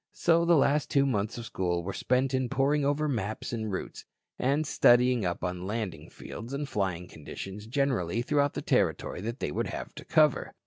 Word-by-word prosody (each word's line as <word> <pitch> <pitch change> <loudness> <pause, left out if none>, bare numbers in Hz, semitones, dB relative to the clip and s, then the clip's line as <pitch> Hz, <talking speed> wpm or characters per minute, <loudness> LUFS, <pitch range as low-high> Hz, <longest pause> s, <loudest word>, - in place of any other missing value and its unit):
So 170 0 +3
the 170 -1 +5
last 145 +1 +2
two 140 -1 +3
months 110 -4 -1
of 120 - -6
school 90 -5 -1
were 95 +2 -4
spent 130 +1 +1
in 130 -1 0
poring 145 +3 +2
over 145 +2 +1
maps 110 -4 -3
and 110 -2 -3
routes, 95 - -5 0.4
and 140 +4 +2
in - - 0
studying 125 -5 +4
up 90 0 -2
on 90 0 -3
landing 105 -5 -4
fields 115 +4 -9
and 140 +1 -3
flying 95 -6 -2
conditions 95 +6 -8
generally 120 - 0
throughout 145 +1 +1
the - - -3
territory - - 0
they 115 - -3
would - - -1
have - - -6
to - - -9
cover. 155 -4 +2
120 Hz, 190 wpm, -29 LUFS, 100-140 Hz, 0.4 s, the